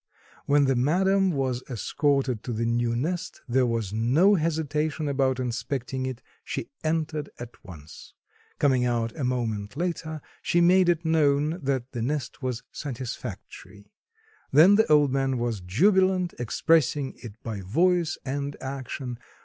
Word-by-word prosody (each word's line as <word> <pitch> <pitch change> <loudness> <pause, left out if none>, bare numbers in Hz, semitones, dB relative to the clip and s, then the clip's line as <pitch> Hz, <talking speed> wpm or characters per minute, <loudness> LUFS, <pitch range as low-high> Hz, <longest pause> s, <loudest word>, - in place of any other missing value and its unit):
When 145 0 +4
the 135 -1 +2
madam 190 +9 +2
was 130 -6 -1
escorted 135 0 0
to 120 - -3
the 115 +1 -1
new 115 0 0
nest 165 +8 -3
there 125 0 +2
was 115 -4 -2
no 130 - +4
hesitation 155 -2 -1
about 135 -2 +1
inspecting 130 +1 -3
it; 130 -1 -6 0.2
she - - -5
entered 155 -2 -1
at 120 0 -10
once. 80 -5 -12 0.4
Coming 130 -4 +3
out 120 -2 -1
a 150 - -4
moment 115 -3 -2
later, 160 -2 -3 0.2
she 175 - +1
made 180 +1 +5
it 170 -1 +1
known 155 0 +2
that 130 -3 -2
the 120 - -4
nest 140 +2 -3
was 125 -3 -3
satisfactory. 120 -5 -7 0.7
Then 160 +8 +7
the 205 -6 +3
old 145 -2 +5
man 135 -1 0
was 120 -4 -2
jubilant, 185 - +2
expressing 140 +3 +1
it 115 -5 -8
by 110 -4 -4
voice 170 - +1
and 140 +1 -3
action. 130 -2 -5
135 Hz, 140 wpm, -26 LUFS, 120-160 Hz, 0.7 s, Then